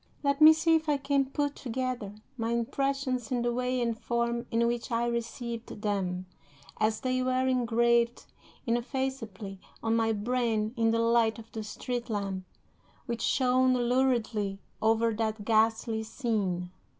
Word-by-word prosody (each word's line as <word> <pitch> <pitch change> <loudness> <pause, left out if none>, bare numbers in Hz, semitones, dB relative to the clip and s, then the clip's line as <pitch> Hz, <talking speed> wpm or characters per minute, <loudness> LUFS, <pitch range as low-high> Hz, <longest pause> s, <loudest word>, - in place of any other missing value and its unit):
Let 280 +1 +1
me 310 +1 +11
see 320 +1 +3
if 315 -1 +2
I 290 - +3
can 275 0 +1
put 285 +1 -1
together 245 -4 -3 0.2
my 230 -1 -1
impressions 260 0 -1
in 245 -2 0
the 240 0 +1
way 250 +1 0
and 235 -1 0
form 235 +1 -1
in 230 +1 +2
which 235 +1 -2
I 230 +1 +1
received 235 -1 -4
them, 185 -3 -1 0.5
as 215 0 +1
they 255 0 0
were 255 0 +1
engraved 235 -1 +2 0.4
ineffaceably 235 -5 -3 0.2
on 225 0 +2
my 225 -1 +2
brain 220 0 0
in 225 -1 +2
the 225 - +2
light 230 -1 +3
of 225 0 -12
the 220 - -5
street 240 +3 -4
lamp 195 -3 -3 0.6
which 235 -2 -3
shone 255 -1 +3
luridly 240 -5 +1 0.2
over 225 +1 +3
that 215 -1 -2
ghastly 220 0 +2
scene. 210 -7 -2
235 Hz, 150 wpm, -29 LUFS, 220-255 Hz, 0.6 s, me